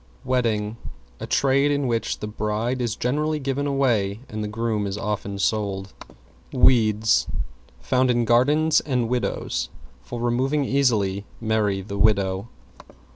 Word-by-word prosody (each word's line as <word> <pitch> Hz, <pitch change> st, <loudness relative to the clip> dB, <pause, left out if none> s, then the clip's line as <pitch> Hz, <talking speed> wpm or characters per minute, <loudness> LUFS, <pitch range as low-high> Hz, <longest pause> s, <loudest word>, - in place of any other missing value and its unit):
=WEDDING= 115 Hz, -4 st, 0 dB, 0.4 s
A -, -, -6 dB
trade 140 Hz, +1 st, +3 dB
in 145 Hz, -1 st, 0 dB
which 115 Hz, -2 st, -1 dB
the 105 Hz, -, -3 dB
bride 110 Hz, +4 st, -2 dB
is 115 Hz, -3 st, -1 dB
generally 150 Hz, +6 st, 0 dB
given 140 Hz, 0 st, -2 dB
away, 115 Hz, -7 st, +1 dB
and 110 Hz, 0 st, -5 dB
the -, -, -2 dB
groom 110 Hz, -1 st, -1 dB
is 100 Hz, +1 st, -4 dB
often 100 Hz, -1 st, -3 dB
sold. 100 Hz, -2 st, -1 dB, 0.6 s
=WEEDS= 110 Hz, -4 st, +3 dB, 0.5 s
Found 130 Hz, 0 st, +2 dB
in 120 Hz, -1 st, +2 dB
gardens 145 Hz, +7 st, +4 dB
and 125 Hz, -5 st, -1 dB
widows. 60 Hz, -, -2 dB, 0.3 s
For 90 Hz, -, -7 dB
removing 130 Hz, +5 st, +1 dB
easily, 105 Hz, -8 st, +1 dB
marry 110 Hz, -3 st, 0 dB
the 100 Hz, 0 st, -6 dB
widow. 100 Hz, -1 st, +2 dB
115 Hz, 130 wpm, -23 LUFS, 105-130 Hz, 0.6 s, gardens